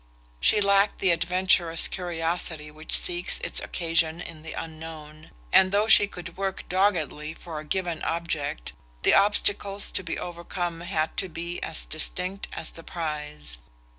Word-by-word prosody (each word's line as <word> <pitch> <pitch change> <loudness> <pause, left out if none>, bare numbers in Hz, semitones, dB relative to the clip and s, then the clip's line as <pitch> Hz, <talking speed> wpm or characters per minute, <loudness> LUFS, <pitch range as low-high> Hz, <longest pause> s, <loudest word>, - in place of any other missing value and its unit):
She 210 - +4
lacked 200 0 +4
the 190 - +3
adventurous 175 -1 +3
curiosity 165 -3 -3
which 155 +1 +3
seeks 175 0 +1
its - - 0
occasion 165 -1 0
in 165 -3 -8
the 160 - -7
unknown; 160 -1 -8 0.2
and 185 0 +6
though 205 +2 +3
she 205 -2 +8
could 175 -3 -9
work 195 -1 -3
doggedly 165 -5 0
for 165 -3 -7
a - - -7
given 175 0 -2
object 155 - -2 0.3
the - - +5
obstacles 200 0 +2
to - - 0
be 170 -3 -4
overcome 175 0 -4
had 160 -2 -1
to 190 - 0
be 170 +1 -5
as 160 - -2
distinct 180 +5 -2
as 160 - -4
the 165 - -10
prize. 150 - -3
170 Hz, 150 wpm, -26 LUFS, 160-185 Hz, 0.3 s, she